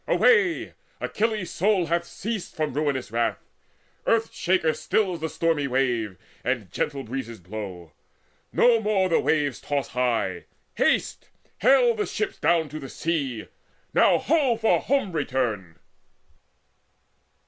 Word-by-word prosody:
Away! 385 Hz, -8 st, +3 dB, 0.3 s
Achilles 215 Hz, -4 st, -1 dB
soul 195 Hz, -1 st, +2 dB
Hath 170 Hz, +2 st, 0 dB
ceased 215 Hz, +2 st, -5 dB
from 155 Hz, -3 st, -2 dB
ruinous 140 Hz, -6 st, -1 dB
wrath; 115 Hz, 0 st, 0 dB, 0.7 s
Earth 225 Hz, 0 st, +2 dB
shaker 175 Hz, -4 st, +1 dB
stills 185 Hz, -6 st, 0 dB
The 160 Hz, 0 st, -3 dB
stormy 160 Hz, -3 st, 0 dB
wave, 120 Hz, -7 st, 0 dB, 0.3 s
and 120 Hz, -8 st, -2 dB
gentle 140 Hz, +6 st, -2 dB
breezes 115 Hz, -2 st, -6 dB
blow; 90 Hz, -3 st, -8 dB, 0.6 s
No 240 Hz, -2 st, +4 dB
more 200 Hz, -3 st, +1 dB
the 165 Hz, -, +3 dB
waves 145 Hz, -5 st, 0 dB
toss 145 Hz, -1 st, -2 dB
high. 125 Hz, -2 st, -1 dB, 0.3 s
Haste, -, -, 0 dB, 0.3 s
hale -, -, +5 dB
the 430 Hz, -2 st, -2 dB
ships 405 Hz, -2 st, -3 dB
Down 165 Hz, -2 st, +2 dB
to 155 Hz, +2 st, -6 dB
the 135 Hz, -3 st, -8 dB
sea. 135 Hz, -, -2 dB, 0.5 s
Now, -, -, +5 dB
ho 285 Hz, -6 st, +2 dB
for 225 Hz, 0 st, +3 dB
home 270 Hz, -8 st, 0 dB
return!" 125 Hz, -, -2 dB
155 Hz, 125 wpm, -25 LUFS, -, 0.7 s, hale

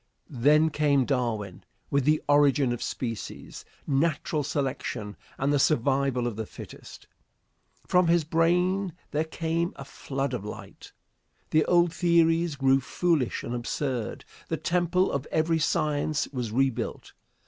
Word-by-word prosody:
Then 150 Hz, +5 st, +3 dB
came 145 Hz, -3 st, +2 dB
Darwin 115 Hz, -8 st, -2 dB, 0.3 s
with 140 Hz, -2 st, +1 dB
the 155 Hz, +1 st, +2 dB
"Origin 145 Hz, -3 st, +4 dB
of 120 Hz, -, -6 dB
Species," 115 Hz, -6 st, -5 dB, 0.2 s
"Natural 150 Hz, +1 st, 0 dB
Selection," 135 Hz, -7 st, -3 dB, 0.2 s
and 140 Hz, +2 st, +1 dB
the 145 Hz, -, +3 dB
"Survival 135 Hz, -2 st, +2 dB
of 120 Hz, -3 st, -2 dB
the 110 Hz, -1 st, -4 dB
Fittest." -, -, -11 dB, 0.8 s
From 180 Hz, -1 st, +3 dB
his 170 Hz, 0 st, +3 dB
brain 180 Hz, +4 st, +1 dB, 0.2 s
there 150 Hz, +2 st, +1 dB
came 165 Hz, +2 st, -2 dB
a 135 Hz, -, -9 dB
flood 135 Hz, 0 st, -4 dB
of 120 Hz, -5 st, -3 dB
light. 105 Hz, -, -10 dB, 0.6 s
The 155 Hz, 0 st, +4 dB
old 175 Hz, -1 st, +3 dB
theories 165 Hz, -2 st, +2 dB
grew 135 Hz, 0 st, +3 dB
foolish 160 Hz, -3 st, 0 dB
and 120 Hz, -, -4 dB
absurd. 120 Hz, 0 st, -3 dB, 0.2 s
The -, -, -2 dB
temple 180 Hz, +1 st, +1 dB
of 140 Hz, 0 st, -3 dB
every 160 Hz, +1 st, +1 dB
science 155 Hz, -1 st, 0 dB
was 125 Hz, -5 st, -4 dB
rebuilt. 130 Hz, 0 st, -1 dB
145 Hz, 135 wpm, -27 LUFS, 130-165 Hz, 0.8 s, Origin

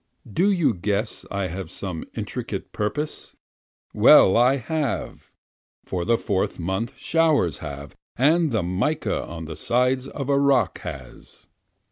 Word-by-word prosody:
Do 190 Hz, -, +3 dB
you 165 Hz, -, +2 dB
guess 100 Hz, +4 st, -2 dB
I 100 Hz, -1 st, -2 dB
have 95 Hz, +3 st, -6 dB
some 90 Hz, -5 st, -5 dB
intricate -, -, -5 dB
purpose? 145 Hz, +9 st, -3 dB, 0.6 s
Well 95 Hz, -, +7 dB
I 125 Hz, +3 st, +5 dB
have, 140 Hz, 0 st, -3 dB, 0.6 s
for 90 Hz, -2 st, -3 dB
the 115 Hz, +1 st, +3 dB
Fourth 100 Hz, -5 st, -1 dB
month 95 Hz, +6 st, -3 dB
showers 155 Hz, -, +2 dB
have, 70 Hz, 0 st, -8 dB, 0.2 s
and 155 Hz, +4 st, +3 dB
the 110 Hz, -5 st, 0 dB
mica 105 Hz, -, -1 dB
on 80 Hz, -1 st, -7 dB
the 80 Hz, 0 st, -7 dB
side 125 Hz, -, +1 dB
of 140 Hz, -1 st, -5 dB
a 140 Hz, -1 st, +3 dB
rock 140 Hz, -1 st, +2 dB
has. -, -, -10 dB
115 Hz, 135 wpm, -24 LUFS, 95-140 Hz, 0.6 s, Well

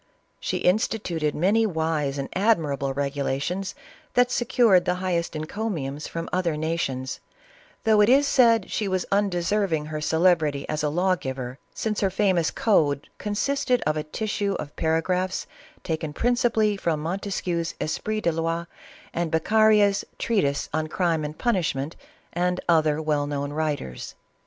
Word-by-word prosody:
She -, -, -2 dB
insti 215 Hz, +3 st, +2 dB
tuted 155 Hz, -3 st, -1 dB
many 210 Hz, +7 st, +3 dB
wise 160 Hz, -5 st, -1 dB
and 135 Hz, -1 st, -3 dB
admirable 155 Hz, -10 st, +1 dB
regulations 140 Hz, +6 st, -2 dB, 0.4 s
that 245 Hz, 0 st, +4 dB
secured 230 Hz, -6 st, +4 dB
the 180 Hz, -, +1 dB
highest 180 Hz, -3 st, -2 dB
encomiums 155 Hz, -4 st, -3 dB
from 165 Hz, 0 st, -5 dB
other 175 Hz, -4 st, 0 dB
nations, 150 Hz, -5 st, -2 dB, 0.6 s
though 220 Hz, -2 st, +5 dB
it 210 Hz, -, +5 dB
is 280 Hz, +3 st, +5 dB
said 230 Hz, -7 st, +4 dB
she 210 Hz, -, -1 dB
was 185 Hz, -2 st, -1 dB
undeserving 195 Hz, -4 st, +1 dB
her 155 Hz, 0 st, -5 dB
celebrity 160 Hz, -3 st, +2 dB
as 155 Hz, 0 st, -2 dB
a 150 Hz, -, +1 dB
law 180 Hz, +4 st, +2 dB
giver, 130 Hz, -4 st, -6 dB, 0.2 s
since 215 Hz, -2 st, -2 dB
her 195 Hz, -, +3 dB
famous 190 Hz, -4 st, +2 dB
code 150 Hz, -10 st, +1 dB
"consisted 250 Hz, +4 st, 0 dB
of 155 Hz, -, +1 dB
a 155 Hz, -, -1 dB
tissue 200 Hz, +4 st, -2 dB
of 145 Hz, -, -6 dB
para 160 Hz, 0 st, +1 dB
graphs 185 Hz, +1 st, -1 dB, 0.4 s
taken 160 Hz, -2 st, -3 dB
principally 230 Hz, -1 st, +2 dB
from 165 Hz, -5 st, -1 dB
Montesquieu's 175 Hz, 0 st, -2 dB
' -, -, -40 dB
Esprit 215 Hz, +7 st, -2 dB
des 170 Hz, -, +2 dB
Loix,' 165 Hz, +1 st, -2 dB, 0.5 s
and 170 Hz, -1 st, -1 dB
Beccaria's 205 Hz, +4 st, +4 dB
treatise 145 Hz, -11 st, 0 dB
on 155 Hz, 0 st, 0 dB
crime 165 Hz, -1 st, 0 dB
and 150 Hz, +1 st, -5 dB
punish 190 Hz, -, +1 dB
ment, 140 Hz, +4 st, -4 dB, 0.4 s
and 180 Hz, +1 st, 0 dB
other 155 Hz, -2 st, +3 dB
well 150 Hz, -2 st, 0 dB
known 145 Hz, 0 st, -3 dB
writers." 150 Hz, -, -3 dB
170 Hz, 150 wpm, -25 LUFS, 150-205 Hz, 0.6 s, though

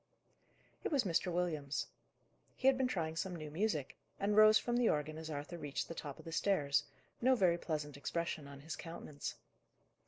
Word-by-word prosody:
It -, -, -1 dB
was 280 Hz, -4 st, +3 dB
Mr. 180 Hz, -1 st, +1 dB
Williams. 155 Hz, -5 st, -1 dB, 0.7 s
He -, -, -7 dB
had 270 Hz, 0 st, +7 dB
been 260 Hz, 0 st, +2 dB
trying 165 Hz, -9 st, -1 dB
some 180 Hz, +3 st, -2 dB
new 155 Hz, -2 st, -6 dB
music, 160 Hz, -5 st, -1 dB, 0.2 s
and 205 Hz, +1 st, +1 dB
rose 215 Hz, 0 st, +9 dB
from 240 Hz, 0 st, 0 dB
the 245 Hz, -2 st, +4 dB
organ 155 Hz, +1 st, 0 dB
as 160 Hz, 0 st, -6 dB
Arthur 150 Hz, +3 st, -5 dB
reached 145 Hz, -3 st, -3 dB
the -, -, -5 dB
top 145 Hz, -4 st, -6 dB
of -, -, -13 dB
the 165 Hz, -, -6 dB
stairs, 160 Hz, -6 st, +2 dB, 0.4 s
no 260 Hz, +2 st, +5 dB
very 175 Hz, -6 st, +3 dB
pleasant 150 Hz, -4 st, -3 dB
expression 155 Hz, +1 st, -2 dB
on 140 Hz, 0 st, -10 dB
his 160 Hz, +2 st, -5 dB
countenance. 155 Hz, -3 st, -6 dB
165 Hz, 185 wpm, -36 LUFS, 150-200 Hz, 0.7 s, rose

